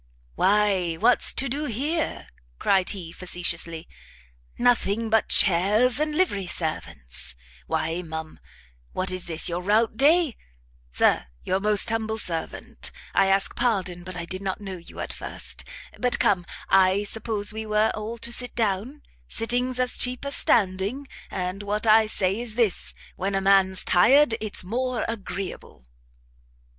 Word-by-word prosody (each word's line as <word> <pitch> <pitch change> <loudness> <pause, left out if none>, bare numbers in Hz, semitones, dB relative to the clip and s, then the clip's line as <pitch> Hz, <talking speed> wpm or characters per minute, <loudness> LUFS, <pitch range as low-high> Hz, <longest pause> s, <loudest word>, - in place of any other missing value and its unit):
"Why 195 - +2
what's 240 +9 +4
to 275 - +1
do 285 +4 -2
here?" 295 +7 -2 0.3
cried 190 - +2
he, 180 -5 -4
facetiously, 170 -2 -3 0.7
"nothing 230 -2 +1
but 220 -1 +2
chairs 210 +8 +3
and 305 0 -1
livery 205 - +1
servants! 80 - -6 0.3
Why, 160 +2 -1
ma'am, 160 -2 -7 0.5
what 185 0 -1
is 185 -1 -4
this 165 -2 +3
your 175 +1 -1
rout 215 +4 +1
day? 305 0 +4 0.5
Sir - - +2 0.2
your 190 - 0
most 210 +1 +2
humble 220 -1 -2
servant. 165 -6 -5 0.2
I 195 - +4
ask 195 0 +1
pardon, 190 -7 -1
but 185 0 -7
I 170 - -4
did 185 +2 -1
not 195 0 -3
know 195 -3 -6
you 170 - -13
at - - -4
first. - - -9 0.4
But 250 0 +2
come, 180 -3 +1 0.6
suppose 215 -1 -2
we 220 0 -5
were 215 +1 +2
all 220 +2 -5
to 235 - -3
sit 245 0 +1
down? 225 +6 -1 0.2
Sitting's 245 - 0
as 250 0 +2
cheap 250 +2 -1
as 280 - 0
standing, 205 +6 +2 0.2
and 185 +2 -4
what 210 +2 -2
I 220 0 +5
say 195 -1 0
is 235 -3 -5
this; 230 -6 0 0.2
when 195 +1 -2
a - - +2
man's 190 -1 +3
tired, 260 +8 +5
it's 215 -3 -1
more 245 +4 -2
agreeable." 195 - -6
205 Hz, 145 wpm, -25 LUFS, 185-235 Hz, 0.7 s, I